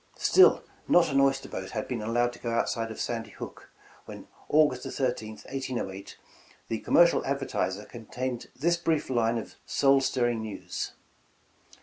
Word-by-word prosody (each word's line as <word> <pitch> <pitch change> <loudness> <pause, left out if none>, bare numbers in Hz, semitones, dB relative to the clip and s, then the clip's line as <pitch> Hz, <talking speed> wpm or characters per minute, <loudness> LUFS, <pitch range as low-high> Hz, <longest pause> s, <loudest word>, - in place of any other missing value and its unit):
Still 375 - +5 0.3
''not 170 -3 +5
an 135 - +3
oyster 135 0 +2
boat - - -6
had - - -4
been - - -3
allowed 120 +2 +1
to 120 - -13
go 120 - -4
out 115 0 +1
side 115 -1 -2
of 110 - -8
Sandy 115 -2 -3
Hook" - - -10 0.4
when - - -10 0.2
August 145 -4 +3
13th, 115 -5 -3
1808, 120 -8 -5 0.5
the 115 - -1
"Commercial 170 0 +4
Advertiser" 105 -8 -2
contained 120 +1 -5
this 170 +5 +1
brief 160 -5 -1
line 115 -1 +2
of 115 - -7
soul 135 -1 +4
stirring 120 -3 0
news. 110 -2 -5
120 Hz, 150 wpm, -28 LUFS, 115-135 Hz, 0.5 s, Still